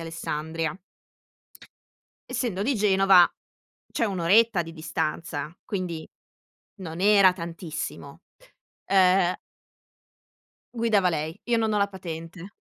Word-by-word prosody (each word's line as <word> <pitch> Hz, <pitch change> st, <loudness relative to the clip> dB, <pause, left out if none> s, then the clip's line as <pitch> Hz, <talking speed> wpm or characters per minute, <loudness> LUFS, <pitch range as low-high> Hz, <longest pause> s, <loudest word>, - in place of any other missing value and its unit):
Alessandria. 160 Hz, 0 st, -4 dB, 1.5 s
Essendo 200 Hz, -7 st, -2 dB
di 270 Hz, +6 st, +1 dB
Genova 195 Hz, -4 st, +5 dB, 0.6 s
c'è -, -, 0 dB
1 195 Hz, -4 st, -2 dB
oretta 200 Hz, +2 st, +4 dB
di 165 Hz, 0 st, -10 dB
distanza, 160 Hz, 0 st, -4 dB
quindi 175 Hz, -5 st, -4 dB, 0.7 s
non 165 Hz, -1 st, -7 dB
era 200 Hz, -2 st, +6 dB
tantissimo. 165 Hz, -2 st, -7 dB, 0.7 s
Uhm 185 Hz, -1 st, +4 dB, 1.4 s
Guidava 225 Hz, -5 st, +2 dB
lei, 160 Hz, +2 st, -3 dB
io 240 Hz, -1 st, +1 dB
non 220 Hz, -1 st, 0 dB
ho 210 Hz, -, +1 dB
la 200 Hz, 0 st, +2 dB
patente, 175 Hz, 0 st, -8 dB
180 Hz, 100 wpm, -25 LUFS, 165-200 Hz, 1.5 s, era